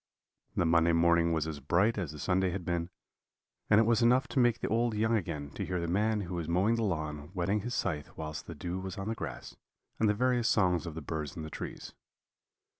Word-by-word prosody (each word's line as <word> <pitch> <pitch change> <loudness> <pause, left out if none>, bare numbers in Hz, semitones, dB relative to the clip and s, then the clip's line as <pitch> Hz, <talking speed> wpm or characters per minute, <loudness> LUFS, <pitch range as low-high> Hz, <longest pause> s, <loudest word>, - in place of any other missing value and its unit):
"The 85 - +2
Monday 85 0 +4
morning 85 0 +4
was 80 -2 0
as 80 -2 -5
bright 90 - +2
as 90 -8 -3
the 75 - -9
Sunday 95 +4 +1
had 90 0 -4
been, 85 0 -1 0.8
and 105 - +6
it - - +6
was 115 +1 +3
enough 125 +4 +4
to - - 0
make 120 -2 +3
the - - -2
old 115 0 +1
young 110 +2 +2
again 75 -8 -3
to - - -4
hear 90 -1 -2
the 85 - -2
man 105 +4 +1
who 90 -2 -5
was 85 -2 -3
mowing 95 +6 +3
the 115 -1 0
lawn 75 -6 -3
whetting 95 +4 0
his 120 +4 -4
scythe 75 -3 -2
whilst 75 -1 -6
the 85 - -7
dew 90 +4 -4
was 95 +2 -6
on 100 +2 -3
the - - 0
grass, 80 - -7 0.4
and 110 - +3
the 105 - +2
various 125 0 +2
songs 90 -5 +2
of 80 - -6
the 80 - -6
birds 75 -1 -4
in 80 - -4
the 80 - -7
trees. - - -7
90 Hz, 235 wpm, -31 LUFS, 80-110 Hz, 0.8 s, and